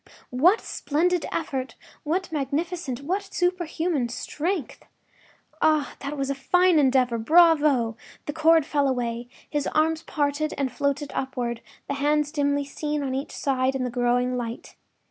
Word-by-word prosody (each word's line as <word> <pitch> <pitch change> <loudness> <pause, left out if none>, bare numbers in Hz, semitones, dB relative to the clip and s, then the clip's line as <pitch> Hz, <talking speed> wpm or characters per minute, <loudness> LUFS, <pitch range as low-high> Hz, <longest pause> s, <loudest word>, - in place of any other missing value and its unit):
What 335 - +4
splendid 345 +4 0
effort!—what 310 +4 -4
magnificent, 295 -2 -2
what 370 +7 -1
superhuman 345 -6 0
strength! 300 +6 -3 0.8
Ah, 310 -2 +2
that 285 +1 -5
was 275 0 -1
a - - +1
fine 355 +5 +3
endeavor! 255 -4 +3
Bravo! 295 -5 +4 0.3
The 295 - -3
cord 320 0 +4
fell 285 -2 +1
away; 240 -2 -2 0.2
his 295 -1 -2
arms 320 +1 +1
parted 300 -1 -1
and 275 -3 -1
floated 285 0 -1
upward, 245 -3 -3 0.3
the - - -2
hands 295 +1 +1
dimly 285 -2 0
seen 295 +1 -3
on 265 -1 -2
each 270 +2 -3
side 265 -1 0
in 260 - -1
the 250 - -2
growing 245 +1 +1
light. 235 -1 -6
285 Hz, 140 wpm, -25 LUFS, 260-320 Hz, 0.8 s, What